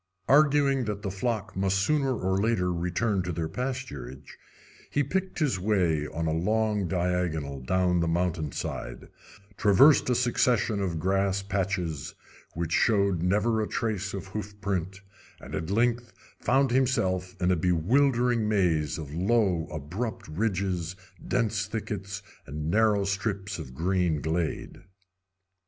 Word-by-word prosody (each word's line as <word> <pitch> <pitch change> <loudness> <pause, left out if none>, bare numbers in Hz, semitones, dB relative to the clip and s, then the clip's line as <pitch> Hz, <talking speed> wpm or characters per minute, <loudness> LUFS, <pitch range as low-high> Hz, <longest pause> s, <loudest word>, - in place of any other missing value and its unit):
Arguing 140 -2 +4
that 105 -1 -4
the 100 - -2
flock 110 +2 -3
must 95 0 +1
sooner 135 +5 +1
or 95 -1 0
later 100 -4 +1
return 90 +4 0
to 90 0 -3
their 80 -1 -2
pasturage, 80 - -5 0.6
he 145 - +1
picked 190 +7 -2
his 140 - +1
way 90 -7 +1
on 80 +2 -3
a 80 - 0
long 105 +3 +1
diagonal 85 -5 -1
down 90 +5 +1
the 85 - +1
mountainside, 80 -3 -3 0.5
traversed 130 +9 +5
a 125 - +3
succession 120 -3 +2
of 90 -4 -1
grass 95 +2 +1
patches, 95 -6 -2 0.4
which 85 0 -3
showed 100 -4 +2
never 105 +5 +2
a 105 - -1
trace 105 -3 -2
of 100 0 -5
hoof 105 +1 -7
print, 95 -1 -3 0.4
and - - -11
at 80 +2 -3
length 120 +3 +1 0.3
found 135 0 +2
himself 110 -9 +1
in 90 0 +2
a - - +4
bewildering 115 - +2
maze 85 -8 +1
of 75 -3 -7
low, 95 -2 +1
abrupt 85 - -5
ridges, 90 -1 -1 0.3
dense 110 -3 0
thickets, 100 -2 -5 0.2
and 75 +2 -3
narrow 105 -1 +3
strips 100 -1 -2
of 65 -5 -8
green 90 -1 +1
glade. 80 +2 -3
95 Hz, 135 wpm, -27 LUFS, 85-110 Hz, 0.6 s, traversed